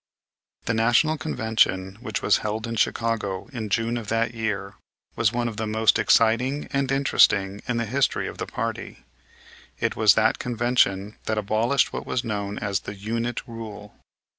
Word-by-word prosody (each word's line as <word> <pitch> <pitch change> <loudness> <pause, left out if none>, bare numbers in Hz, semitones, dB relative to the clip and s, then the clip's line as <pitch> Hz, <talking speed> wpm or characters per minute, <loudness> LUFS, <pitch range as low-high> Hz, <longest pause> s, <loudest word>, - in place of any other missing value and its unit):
The 115 - 0
National 120 +8 +3
Convention, 110 - 0
which 110 -5 -4
was 105 - +4
held 110 +1 -3
in 115 0 -4
Chicago 110 -4 -1
in 110 -4 -4
June 115 +4 0
of 115 -3 -6
that 115 +1 0
year, 105 -3 -3 0.4
was - - +2
one 120 0 -1
of 110 -2 -5
the 110 -1 -2
most 110 +1 +3
exciting 125 +6 +2
and 135 -1 0
interesting 100 -7 +3
in 120 -1 0
the 115 - 0
history 130 +5 0
of - - -8
the - - -3
party. - - -5 0.7
It - - 0
was - - +5
that - - +2
convention 115 -4 0
that 110 - -1
abolished 110 +6 +1
what - - -5
was 125 - -1
known 105 -3 -3
as 100 -2 -1
"the 105 - -8
unit 115 +4 -3
rule." 110 -3 -9
110 Hz, 165 wpm, -24 LUFS, 105-120 Hz, 0.7 s, was